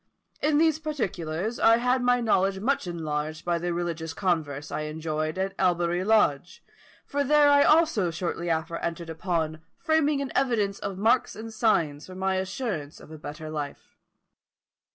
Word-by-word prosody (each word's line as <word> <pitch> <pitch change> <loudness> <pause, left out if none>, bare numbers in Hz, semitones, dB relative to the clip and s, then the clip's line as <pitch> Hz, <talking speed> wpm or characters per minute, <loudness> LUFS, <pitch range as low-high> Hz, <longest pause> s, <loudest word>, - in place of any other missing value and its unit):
In 300 -1 +2
these 315 -1 +3
particulars, 215 - -3
I 225 0 +6
had 250 +2 +1
my 245 0 +3
knowledge 195 -4 +2
much 245 -1 0
enlarged 155 -2 -4
by 170 -1 +1
the 175 +1 -2
religious 170 -2 -3
converse 150 -6 -1
I - - -2
enjoyed 155 +1 -3
at 190 +1 -1
Albury 175 -1 +1
Lodge, 190 -7 +1 0.4
for 285 0 -1
there 290 +1 +5 0.2
also 310 - +4
I - - 0
shortly 170 +1 -3
after 165 +1 -1
entered 170 0 -4
upon 160 -2 -2 0.2
framing 315 -3 +2
an 280 -1 -3
evidence 215 -7 +1
of 195 - -5
marks 225 +5 +2
and 225 +1 -8
signs 165 -10 +1
for 185 - -10
my 190 0 0
assurance 190 - -4
of - - -14
a 155 - -9
better 155 +1 -7
life. 150 -2 -6
185 Hz, 160 wpm, -26 LUFS, 160-235 Hz, 0.4 s, I